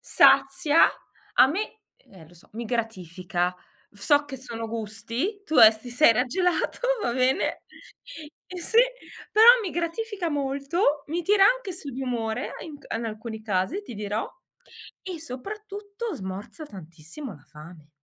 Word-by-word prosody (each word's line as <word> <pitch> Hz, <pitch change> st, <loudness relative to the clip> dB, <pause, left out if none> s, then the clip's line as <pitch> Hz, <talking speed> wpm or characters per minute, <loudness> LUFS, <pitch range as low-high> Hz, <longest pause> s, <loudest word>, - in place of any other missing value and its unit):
sazia, 290 Hz, +4 st, +5 dB, 0.4 s
a 250 Hz, -, +7 dB
me 415 Hz, +9 st, -4 dB, 0.2 s
e 190 Hz, -, -20 dB
eh 160 Hz, -, -14 dB
lo 170 Hz, -, -20 dB
so, 170 Hz, -, -19 dB
mi 235 Hz, +2 st, -5 dB
gratifica, 185 Hz, -6 st, -2 dB, 0.4 s
so 290 Hz, +8 st, +2 dB
che 275 Hz, -3 st, -8 dB
sono 230 Hz, -3 st, -6 dB
gusti, 230 Hz, -, -4 dB
tu 315 Hz, -, -2 dB
adesso 220 Hz, -1 st, +8 dB
ti 245 Hz, -, -9 dB
sei 245 Hz, 0 st, +5 dB
raggelato, 350 Hz, +10 st, 0 dB, 0.2 s
va 240 Hz, -, 0 dB
bene 255 Hz, +1 st, +1 dB, 0.9 s
eh 365 Hz, -, -8 dB
sì, 445 Hz, +6 st, +1 dB, 0.5 s
però 435 Hz, +1 st, +6 dB
mi 410 Hz, -, -3 dB
gratifica 345 Hz, +2 st, -3 dB
molto, 285 Hz, +2 st, 0 dB
mi 335 Hz, +4 st, -1 dB
tira 395 Hz, +3 st, +4 dB
anche -, -, +2 dB
su 325 Hz, -5 st, -6 dB
di 265 Hz, +1 st, -6 dB
umore 230 Hz, -4 st, -3 dB
e -, -, -8 dB
in 305 Hz, -3 st, -9 dB
c -, -, -17 dB
in 230 Hz, -, -4 dB
alcuni 220 Hz, 0 st, -6 dB
casi 210 Hz, -, -1 dB
ti 405 Hz, -, -10 dB
dirò, 210 Hz, +1 st, -3 dB, 0.8 s
e 360 Hz, -4 st, -6 dB
soprattutto 405 Hz, -, -7 dB
smorza 200 Hz, -, -7 dB
tantissimo 185 Hz, -, -10 dB
la 145 Hz, -, -17 dB
fame. 155 Hz, 0 st, -14 dB
260 Hz, 155 wpm, -25 LUFS, 215-345 Hz, 0.9 s, adesso